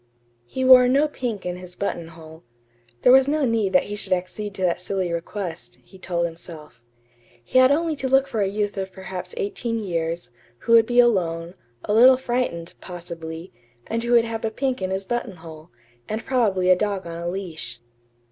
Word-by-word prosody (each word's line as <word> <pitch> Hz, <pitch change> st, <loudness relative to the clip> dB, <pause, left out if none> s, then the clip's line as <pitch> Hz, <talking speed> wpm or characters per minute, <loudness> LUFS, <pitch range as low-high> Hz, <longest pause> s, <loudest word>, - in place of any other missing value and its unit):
He 260 Hz, -, -2 dB
wore 255 Hz, -1 st, +8 dB
no 280 Hz, +4 st, +3 dB
pink 240 Hz, -9 st, -4 dB
in 180 Hz, 0 st, -3 dB
his 180 Hz, 0 st, -10 dB
buttonhole. 165 Hz, -4 st, -6 dB, 0.6 s
There -, -, +7 dB
was 265 Hz, +1 st, +6 dB
no 300 Hz, 0 st, +1 dB
need 225 Hz, -5 st, +1 dB
that 275 Hz, -, +5 dB
he 205 Hz, -, -6 dB
should 205 Hz, -, -1 dB
accede 195 Hz, +3 st, -4 dB
to 190 Hz, -, -4 dB
that 180 Hz, 0 st, +1 dB
silly 185 Hz, -2 st, -2 dB
request, 170 Hz, 0 st, -5 dB
he 190 Hz, -, -17 dB
told 170 Hz, -2 st, -1 dB
himself. 160 Hz, -6 st, -9 dB, 0.6 s
He 255 Hz, -, +2 dB
had 255 Hz, +1 st, +6 dB
only 320 Hz, +2 st, +1 dB
to 265 Hz, -1 st, -2 dB
look 270 Hz, +1 st, +4 dB
for 220 Hz, -, -2 dB
a 195 Hz, -, +2 dB
youth 205 Hz, +1 st, -2 dB
of 190 Hz, -1 st, -3 dB
perhaps 190 Hz, -, -7 dB
eighteen 390 Hz, -, -2 dB
years, 170 Hz, -, -3 dB, 0.3 s
who -, -, -3 dB
would 225 Hz, -1 st, +7 dB
be 245 Hz, 0 st, +2 dB
alone, 175 Hz, -8 st, +2 dB, 0.3 s
a 210 Hz, -, 0 dB
little 255 Hz, +4 st, +7 dB
frightened, 240 Hz, -10 st, -2 dB
possibly, 170 Hz, -2 st, -8 dB, 0.3 s
and 230 Hz, +1 st, -2 dB
who 235 Hz, +1 st, 0 dB
would 235 Hz, -1 st, +5 dB
have 225 Hz, -1 st, -5 dB
a 225 Hz, -, 0 dB
pink 255 Hz, +1 st, -2 dB
in 185 Hz, -, -1 dB
his 190 Hz, +1 st, -3 dB
buttonhole, 170 Hz, -8 st, -6 dB, 0.4 s
and 220 Hz, +1 st, -4 dB
probably 200 Hz, -8 st, +2 dB
a -, -, +7 dB
dog 200 Hz, -1 st, -2 dB
on 170 Hz, 0 st, -6 dB
a 170 Hz, -, -4 dB
leash. 170 Hz, -10 st, -5 dB
195 Hz, 190 wpm, -23 LUFS, 170-240 Hz, 0.6 s, wore